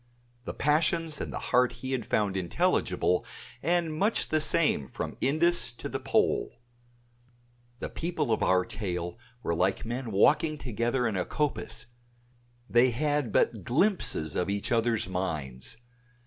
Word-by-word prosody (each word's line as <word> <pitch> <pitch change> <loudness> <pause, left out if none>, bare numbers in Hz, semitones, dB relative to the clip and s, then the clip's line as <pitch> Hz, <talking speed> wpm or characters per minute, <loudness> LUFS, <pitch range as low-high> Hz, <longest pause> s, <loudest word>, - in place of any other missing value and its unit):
The - - -5
passions 155 +2 +1
and - - -4
the - - -4 0.2
heart 125 0 +4
he 130 +3 -6
had 130 -2 -2
found 105 -3 +1
intelligible 90 0 +1 0.4
and 170 -2 +1
much 205 +8 +2
the 155 0 +2
same 155 - +2
from 60 - -5
Indus 170 +3 +3
to - - -6
the - - -4
Pole. - - +1 1.2
The - - -5
people 165 -6 -2
of 110 - +1
our 90 -1 +3
tale 90 0 -4 0.2
were 85 - 0
like 95 +6 0
men 120 0 -4
walking 150 +9 +3
together 120 -1 -1
in 110 -3 0
a 90 - 0
coppice; 120 -5 -2 0.8
they 120 +1 +4
had 145 0 0
but 105 -1 +1
glimpses 130 - +1
of 90 - 0
each 100 +4 -2
others' 115 -3 +1
minds. 80 - -4
120 Hz, 145 wpm, -28 LUFS, 95-150 Hz, 1.2 s, heart